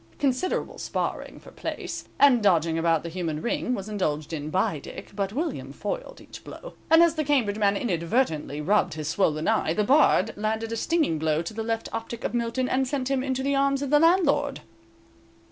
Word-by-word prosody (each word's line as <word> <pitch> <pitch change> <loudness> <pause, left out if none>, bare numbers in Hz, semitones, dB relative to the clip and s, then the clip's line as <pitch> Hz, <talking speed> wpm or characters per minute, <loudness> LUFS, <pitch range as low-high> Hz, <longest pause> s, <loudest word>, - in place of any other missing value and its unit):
Considerable 275 +6 -1
sparring - - -3
for - - -14
place, - - -5
and 270 -5 +6
dodging 170 -5 +3
about 165 -1 +1
the 170 - -5
human 165 -3 -3
ring, 245 +5 -1
was 195 -2 -6
indulged 155 -7 -2
in 150 -1 -4
by 165 -3 0
Dick, - - -10
but 200 -1 -1
William 310 +8 -3
foiled - - -5
each - - -12
blow, - - -10 0.2
and 325 +1 +7
as 335 - +4
the 310 -1 -1
Cambridge 245 -8 +1
man 200 -1 +3
inadvertently 170 - -1
rubbed 180 -1 +1
his 155 -2 -5
swollen 155 -4 +1
eye, 160 - +1
the 210 - +2
Bard 280 +8 +4
landed 220 +2 -2
a - - -1
stinging 295 - 0
blow 155 -1 +1
on 165 - -2
the 220 +1 -5
left 225 0 -2
optic 225 +1 -5
of - - -2
Milton 240 +2 -1
and 265 +1 +1
sent 270 -1 -2
him 270 -1 +1
into 265 -1 -2
the 280 +1 +1
arms 275 0 +1
of 280 - -4
the 295 - +6
landlord. 340 +3 +3
225 Hz, 195 wpm, -26 LUFS, 170-275 Hz, 0.2 s, and